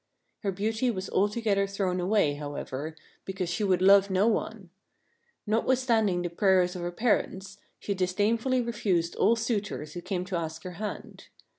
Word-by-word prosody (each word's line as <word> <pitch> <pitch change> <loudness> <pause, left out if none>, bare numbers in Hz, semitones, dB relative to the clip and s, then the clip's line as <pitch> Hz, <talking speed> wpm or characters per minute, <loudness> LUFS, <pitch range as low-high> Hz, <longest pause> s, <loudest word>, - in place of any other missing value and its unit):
Her 200 - -1
beauty 220 +6 -1
was 190 -4 -4
altogether 205 0 +1
thrown 195 -2 -1
away, 185 -4 +2
however, 145 +1 -5 0.3
because 190 -2 -4
she 180 +5 -1
would 185 -2 +2
love 200 +1 +6
no 190 +3 +2
one. 215 -4 -2 0.7
Notwithstanding 225 -4 +1
the 175 - -2
prayers 185 0 +3
of 180 - -5
her 175 0 -3
parents, 195 -2 -1 0.2
she 200 - -3
disdainfully 215 +7 +1
refused 200 -8 0
all 230 - +4
suitors 210 -9 -3
who 175 - -6
came 180 -1 -3
to 185 0 -4
ask 160 -1 -5
her 185 - -6
hand. 210 - -6
195 Hz, 155 wpm, -28 LUFS, 180-215 Hz, 0.7 s, love